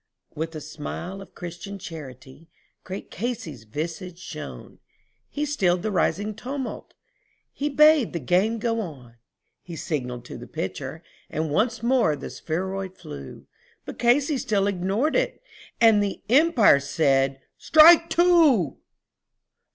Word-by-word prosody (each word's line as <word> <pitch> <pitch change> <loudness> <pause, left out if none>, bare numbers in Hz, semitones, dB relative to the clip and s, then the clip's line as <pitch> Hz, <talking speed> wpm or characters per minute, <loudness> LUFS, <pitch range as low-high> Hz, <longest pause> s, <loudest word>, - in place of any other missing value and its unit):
With 160 +2 -4
a 155 - -5
smile 180 +6 -7
of 195 - -14
Christian 175 +3 -7
charity 150 -3 -10 0.3
great 190 +2 -8
Casey's 195 - -5
visage 165 - -5
shone, 155 -4 -9 0.5
He 295 +1 -2
stilled 185 -12 +1
the 215 - -1
rising 205 +2 0
tumult 260 +4 -5
and - - -44
he 290 +1 -2
bade 300 -3 +5
the 170 - -3
game 185 - +1
go 230 0 -1
on; 130 - -9 0.4
He 170 - -9
signalled 125 -7 -4
to - - -9
the - - -10
pitcher - - -5 0.3
and 155 -1 -2
again 230 - +1
the - - -6
spheroid 190 +3 -4
flew, 70 -2 -10 0.4
But - - -8
Casey 270 +4 +3
still 200 -5 0
ignored 200 - 0
it - - 0 0.4
and 225 -3 +6
the 200 -1 -3
Umpire 270 - +5
said 135 -2 +1 0.2
"Strike 335 +2 +7
two." 330 - +4
195 Hz, 130 wpm, -24 LUFS, 160-245 Hz, 0.5 s, Strike